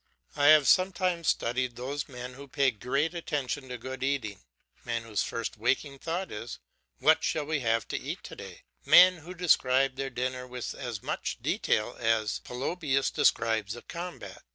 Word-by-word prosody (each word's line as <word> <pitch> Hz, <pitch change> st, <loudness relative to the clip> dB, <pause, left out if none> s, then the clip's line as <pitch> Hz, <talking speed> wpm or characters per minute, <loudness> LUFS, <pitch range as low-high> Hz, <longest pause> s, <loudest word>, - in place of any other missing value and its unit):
I 145 Hz, -1 st, +3 dB
have 150 Hz, -2 st, +7 dB
sometimes 185 Hz, -2 st, +2 dB
studied 120 Hz, +1 st, 0 dB
those 140 Hz, +4 st, -4 dB
men 125 Hz, -1 st, -7 dB
who 140 Hz, +2 st, -11 dB
pay 140 Hz, -1 st, +2 dB
great 135 Hz, -, -1 dB
attention 145 Hz, -5 st, -3 dB
to 125 Hz, -, -5 dB
good 130 Hz, +2 st, -7 dB
eating, 130 Hz, -8 st, -1 dB, 0.4 s
men 115 Hz, -1 st, -2 dB
whose 110 Hz, -3 st, -2 dB
first 115 Hz, -1 st, -3 dB
waking 135 Hz, +5 st, 0 dB
thought 170 Hz, +5 st, -3 dB
is 110 Hz, +2 st, -6 dB, 0.4 s
What -, -, +4 dB
shall 155 Hz, -2 st, 0 dB
we 155 Hz, 0 st, -1 dB
have 115 Hz, -3 st, 0 dB
to -, -, -2 dB
eat -, -, -5 dB
to -, -, -9 dB
day? -, -, -10 dB, 0.2 s
men 180 Hz, 0 st, +8 dB
who 175 Hz, +3 st, -10 dB
describe 135 Hz, -6 st, +3 dB
their 135 Hz, 0 st, -2 dB
dinner 125 Hz, 0 st, -3 dB
with 125 Hz, -1 st, -5 dB
as 120 Hz, -6 st, -6 dB
much -, -, -3 dB
detail 105 Hz, +3 st, 0 dB
as 110 Hz, -2 st, +1 dB
Polybius 135 Hz, +1 st, -1 dB
describes 110 Hz, -2 st, +1 dB
a 120 Hz, -, -10 dB
combat. 175 Hz, +1 st, -7 dB
130 Hz, 170 wpm, -29 LUFS, 120-150 Hz, 0.4 s, men